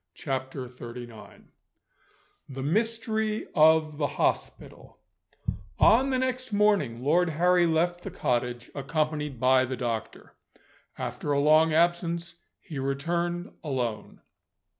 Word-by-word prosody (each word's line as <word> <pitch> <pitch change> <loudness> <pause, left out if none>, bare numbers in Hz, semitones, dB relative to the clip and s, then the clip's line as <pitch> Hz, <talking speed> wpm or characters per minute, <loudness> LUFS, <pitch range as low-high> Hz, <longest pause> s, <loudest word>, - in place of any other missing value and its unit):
CHAPTER 130 -4 -4
XXXIX 120 -2 -10 1.1
THE 135 -1 -6
MYSTERY 220 - -1
OF 155 -1 +4
THE 145 - +1
HOSPITAL - - -3 0.8
ON 255 +5 +5
the 260 - +1
next 255 -1 -2
morning 200 - +2
Lord 170 +5 +3
Harry 175 +2 +3
left 175 +2 +1
the - - -6
cottage, 120 0 -2
accompanied 150 -1 -2
by 130 +1 +4
the 130 0 -4
doctor. 115 -3 -4 0.6
After 145 - -4
a 140 - +2
long 155 +2 +5
absence, 170 +1 +1 0.3
he 150 -4 -7
returned 170 +6 -2
alone. 125 -7 -3
155 Hz, 110 wpm, -27 LUFS, 130-175 Hz, 1.1 s, ON